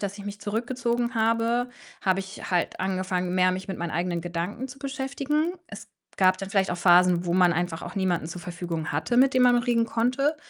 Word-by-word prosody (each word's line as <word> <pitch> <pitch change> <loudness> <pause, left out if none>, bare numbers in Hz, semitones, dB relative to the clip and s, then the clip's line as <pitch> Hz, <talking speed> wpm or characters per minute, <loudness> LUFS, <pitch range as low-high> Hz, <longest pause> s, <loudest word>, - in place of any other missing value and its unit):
dass 200 0 -4
ich 200 - -8
mich 205 0 -7
zurückgezogen 235 +3 -2
habe, 230 +2 +1 0.3
habe 190 -1 +2
ich 195 0 -8
halt 180 -1 0
angefangen, 185 -1 -1
mehr 185 0 +4
mich 185 +1 -5
mit 190 - -4
meinen 170 -1 -3
eigenen 175 +1 -1
Gedanken 175 +8 -4
zu 265 +1 -11
beschäftigen. 280 +4 -1 0.2
Es - - -10 0.3
gab 185 -1 +4
dann 195 0 -6
vielleicht 195 -2 +1
auch - - -3
Phasen, 175 0 +5
wo 170 - -1
man 180 -1 +4
einfach 170 -1 -2
auch - - -7
niemanden 180 -4 0
zur 175 +1 -7
Verfügung 170 -3 -5
hatte, 160 +12 -1
mit 265 +2 +5
dem 255 - +4
man 245 -1 +5
reden 235 -1 +1
konnte 255 +7 0
195 Hz, 205 wpm, -26 LUFS, 180-240 Hz, 0.3 s, Phasen